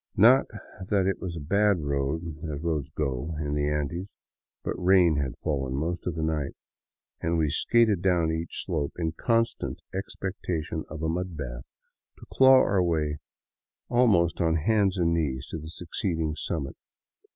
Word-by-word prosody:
Not 125 +7 +6 0.4
that 100 -2 +2
it 95 -1 -1
was 90 -3 -4
a - - -4
bad 100 +6 +2
road, 75 +3 -2
as 75 +1 -5
roads 75 -5 -1
go 75 +2 -2
in 75 -2 -2
the 75 0 0
Andes, 75 +5 -2 0.6
but - - -2
rain 90 -4 +4
had 70 -3 -2
fallen 65 -3 -1
most 85 +6 -2
of 85 - -1
the 80 - -2
night, 75 -3 -1 0.7
and 85 +1 0
we 75 -3 +1
skated 110 -6 +3
down 90 -4 +2
each 80 +1 -4
slope 75 -6 -2
in 80 -2 -1
constant 115 +7 0
expectation 90 -4 -4
of 80 -1 -6
a - - +1
mud 90 +1 -3
bath, - - -6 0.5
to - - -13
claw 130 0 +7
our 95 -2 +2
way 75 -4 0 0.7
almost 105 -10 +3
on 80 -1 +2
hands 100 +3 +2
and 85 -2 +2
knees 70 -5 -1
to 80 - -4
the 80 +1 -8
succeeding 85 -2 -2
summit. 75 -3 -4
80 Hz, 160 wpm, -27 LUFS, 75-95 Hz, 0.7 s, claw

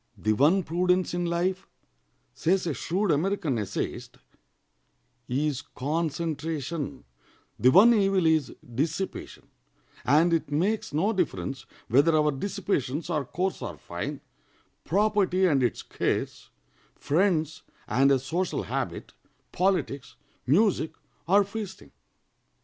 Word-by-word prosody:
"The 110 +3 +1
one 155 - +3
prudence 180 +3 +1
in 175 0 -1
life," 185 +3 -1 0.7
says 185 +3 +1
a 165 - -1
shrewd 185 +6 -1
American 155 - 0
essayist, 105 -3 -4 1.1
"is 140 +1 0
concentration, 155 +1 -3 0.6
the 125 - +5
one 205 - +7
evil 195 -4 +2
is 160 -3 +2
dissipation; 155 +10 -4 0.5
and 155 +7 +4
it 160 -3 0
makes 190 +8 0
no 180 +10 +1
difference 135 - -2 0.2
whether 145 +7 +4
our 150 -1 +3
dissipations 155 -3 -2
are 150 - 0
coarse 180 +8 -2
or - - -5
fine, - - -6 0.6
property 200 -3 +2
and 145 -7 +3
its 120 -3 0
cares, - - -3 0.5
friends 160 -1 0 0.3
and 135 +4 +3
a 135 - +5
social 160 +8 -2
habit, - - -4 0.4
politics, 180 -9 -1 0.3
music, 175 - +2 0.3
or 200 +3 +5
feasting. 200 -1 -7
165 Hz, 110 wpm, -27 LUFS, 140-190 Hz, 1.1 s, one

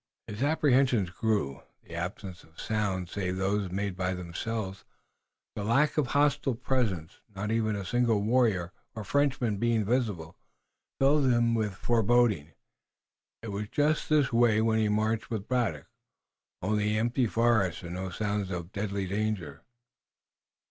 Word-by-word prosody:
His 105 +3 -7
apprehensions 135 - +3
grew. 100 - -1 0.2
The - - -13
absence 90 +2 -5
of 80 0 -19
sounds 95 -5 -2
save 95 -2 -2
those 95 +1 0
made 100 +1 -2
by 90 0 -1
themselves, 95 +3 -4 0.7
the 105 - -3
lack 135 +8 +2
of 150 -5 +1
hostile 145 -1 +2
presence, 110 -10 -2 0.2
not 105 +2 -3
even 110 -2 +1
a 100 -2 -4
single 120 0 +2
warrior 105 -5 +2 0.2
or 110 - -5
Frenchman 125 -3 +1
being 115 0 +1
visible, 105 -9 -1 0.6
filled 140 +1 +4
him 120 -2 +3
with 110 -4 -1
foreboding. 115 -8 +2 0.9
It 115 - -5
was 105 +1 -4
just 150 +4 +1
this 150 -5 +3
way, 115 -2 +4
when 110 0 +2
he 110 -1 +2
marched 110 +1 0
with 110 -4 -4
Braddock, 115 - 0 0.8
only 105 +2 +1
the 105 +1 +1
empty 120 +2 +1
forest, 110 -7 +1
and 85 0 -6
no 95 +1 -4
sign 100 +1 -2
of 90 0 -5
deadly 100 -1 -2
danger. 100 -6 -3
105 Hz, 145 wpm, -29 LUFS, 95-120 Hz, 0.9 s, filled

